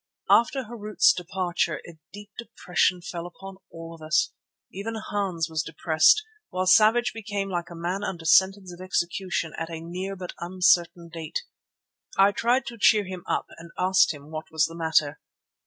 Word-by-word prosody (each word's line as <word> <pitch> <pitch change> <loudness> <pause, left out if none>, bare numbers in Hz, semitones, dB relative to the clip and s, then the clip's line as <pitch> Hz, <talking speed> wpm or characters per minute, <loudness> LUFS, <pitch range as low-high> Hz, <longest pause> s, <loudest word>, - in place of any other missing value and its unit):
After 260 +3 +4
Harût's 230 - +2
departure 185 - -2
a 165 -2 -13
deep 205 0 -11
depression 180 -6 -1
fell 175 -1 -6
upon 195 +2 -11
all 165 0 -9
of 165 - -14
us. 155 0 +1 0.4
Even 215 +4 -5
Hans 195 -6 -2
was 160 -1 -2
depressed, 165 - +3 0.3
while 185 0 -2
Savage 220 +5 +5
became 205 -3 -4
like 175 -1 -3
a 170 - -9
man 175 +4 -3
under 170 -5 -5
sentence 190 +2 +3
of 175 - -12
execution 180 -2 -2
at 165 0 -4
a 165 -1 -6
near 180 +4 -5
but 180 -2 -7
uncertain 175 -1 +2
date. 165 -1 -5 0.7
I 195 +1 +6
tried 240 +5 +1
to 235 -1 -8
cheer 210 +1 +5
him 185 -1 -7
up - - -1
and 170 0 -11
asked 190 +1 +4
him 145 0 -11
what 155 0 -6
was 160 0 +2
the 165 - -7
matter. 160 -3 +1
180 Hz, 170 wpm, -25 LUFS, 165-200 Hz, 0.7 s, I